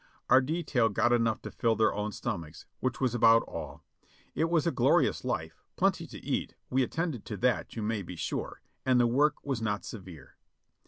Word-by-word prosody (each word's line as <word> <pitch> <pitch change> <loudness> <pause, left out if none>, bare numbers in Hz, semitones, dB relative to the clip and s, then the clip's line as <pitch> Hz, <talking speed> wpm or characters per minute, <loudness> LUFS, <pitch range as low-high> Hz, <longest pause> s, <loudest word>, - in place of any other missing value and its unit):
Our 130 - +8
detail 140 -5 +1
got 115 +3 +2
enough 115 -2 +1
to - - -6
fill 115 -1 +1
their 110 0 +3
own 105 +1 -2
stomachs, 80 -5 -5
which 130 0 -2
was 130 -3 +1
about 115 -1 +6
all. - - -8 0.5
It 160 - +1
was 165 -3 +2
a 170 - +2
glorious - - +2
life; - - -3
plenty - - +1
to - - -9
eat, - - -2 0.2
we 130 +1 +3
attended 155 -2 -2
to 105 - -5
that 125 +1 0
you 110 - -3
may 110 -1 -1
be 90 -1 -8
sure, - - -4 0.2
and 130 -1 +3
the 120 - +5
work 145 +5 +2
was 135 -5 -2
not 105 -1 -2
severe. 90 - -10
115 Hz, 195 wpm, -30 LUFS, 105-130 Hz, 0.5 s, Our